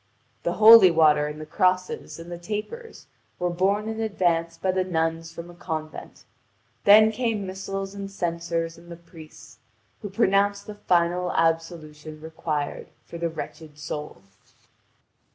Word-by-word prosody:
The - - -1
holy 220 -3 +9
water 155 -3 +4
and 150 +1 -7
the 155 - -7
cross 185 +3 +1
and - - -8 0.2
the 175 - -5
tapers 220 - -7 0.3
were 180 0 -1
borne 200 +4 0
in 220 0 -4
advance 170 -6 0
by 190 - 0
the 185 0 0
nuns 165 -2 -2
from 170 +1 -9
a - - -14
convent; 155 -2 -7 0.6
then 215 +2 +7
came 220 -3 -2
missals 195 +1 -5
and 200 -1 -6
censers 170 -2 -3
and 170 0 -17
the - - -7
priests, 165 -2 -15 0.4
who 205 - -6
pronounce 200 -1 +1
the 210 - -8
final 180 -2 0
absolution 160 -2 -2
required 155 -2 -4 0.2
for 170 - -9
the 170 0 -1
wretched 155 -1 -9
soul. 150 -7 -7
175 Hz, 145 wpm, -25 LUFS, 165-195 Hz, 0.6 s, holy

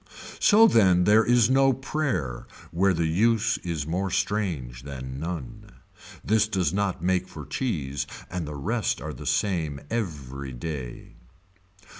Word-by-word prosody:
So 220 +2 +7
then 95 - +5
there 105 +4 +5
is 120 -1 +4
no 135 +1 +4
prayer 125 - -3 0.2
where 95 +3 +3
the 85 -2 0
use 110 +7 +2
is 80 -4 -3
more 90 +5 -1
strange 85 - -2
than 65 -1 -7
none. 105 +6 -6 0.5
This 110 0 +3
does 90 -7 0
not 100 -4 -1
make 95 0 +1
for 80 -6 -9
cheese 70 - -2 0.2
and 90 -4 -4
the 75 - -6
rest 105 - -1
are - - -6
the - - -8
same 80 -8 0
every 70 - -4
day. 65 -2 -7
90 Hz, 140 wpm, -26 LUFS, 75-110 Hz, 0.5 s, So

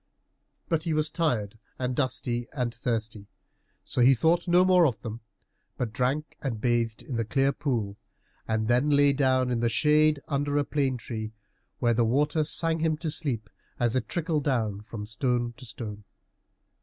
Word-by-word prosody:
But 165 -3 +1
he 160 -1 -1
was 155 0 +1
tired 115 - -1 0.2
and 125 -1 -2
dusty 120 -3 -1
and 125 -4 -2
thirsty, 110 -4 -3 0.6
so - - +1
he 130 +2 +7
thought 165 +8 +2
no 175 +1 +5
more 180 -3 +5
of 120 -5 -3
them, 115 0 -6 0.6
but 115 -3 -3
drank 135 +6 -1
and 120 -6 -3
bathed 115 -1 0
in 125 - -4
the 115 - +1
clear 135 +5 +2
pool, 115 -9 -2 0.5
and 110 -1 0
then 125 +5 +3
lay 145 -1 +5
down 130 -2 +2
in 120 - 0
the 120 0 +2
shade 150 +5 +4
under 145 0 0
a 145 - +3
plane 135 -3 0
tree, 110 -2 -6 0.4
while 120 -1 +2
the 115 +1 +2
water 150 +7 +2
sang 165 +1 0
him 160 -1 +1
to 160 -1 -3
sleep 125 -10 -2 0.3
as 120 -1 +1
it 115 -4 -1
trickled 160 -4 -1
down 110 -7 0
from 105 -1 -7
stone 120 +1 -1
to 130 - -10
stone. 105 -2 -7
125 Hz, 175 wpm, -27 LUFS, 115-150 Hz, 0.6 s, he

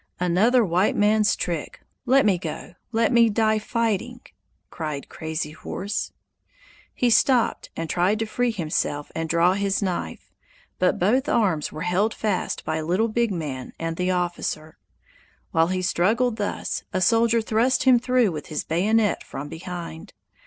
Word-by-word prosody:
"Another 210 +8 +3
white 180 +2 +1
man's 210 0 +3
trick! 170 -4 -4 0.3
Let 270 +2 +5
me 190 -4 +3
go! 165 -1 -6 0.2
Let 230 +4 +2
me 235 -2 +5
die 220 0 +2
fighting!" 230 +2 -2 0.5
cried 155 -4 -5
Crazy 160 -1 -4
Horse. 200 +6 -4 0.8
He 245 -1 +2
stopped 245 +1 +2
and 165 - -3
tried 180 +6 +1
to 225 - -1
free 245 +3 0
himself 155 -7 -2
and 165 0 -3
draw 170 +2 +3
his 200 0 0
knife, 180 - -4 0.5
but 180 - +2
both 255 +10 +2
arms 185 - +1
were 155 - -7
held 185 +5 +1
fast 205 -4 -2
by 160 0 -1
Little 185 +8 +1
Big 235 0 0
Man 145 -8 -5
and 165 0 -3
the 180 +2 -1
officer. 175 -3 -3 0.7
While 165 0 +3
he 185 0 -2
struggled 220 +7 +1
thus, 205 -2 -3
a 185 - 0
soldier 230 +4 +3
thrust 230 +3 +1
him 255 -2 +6
through 250 -4 +2
with 155 -2 -6
his 155 - -3
bayonet 205 +4 +1
from 145 +2 -7
behind. 165 - -8
190 Hz, 150 wpm, -24 LUFS, 165-225 Hz, 0.8 s, him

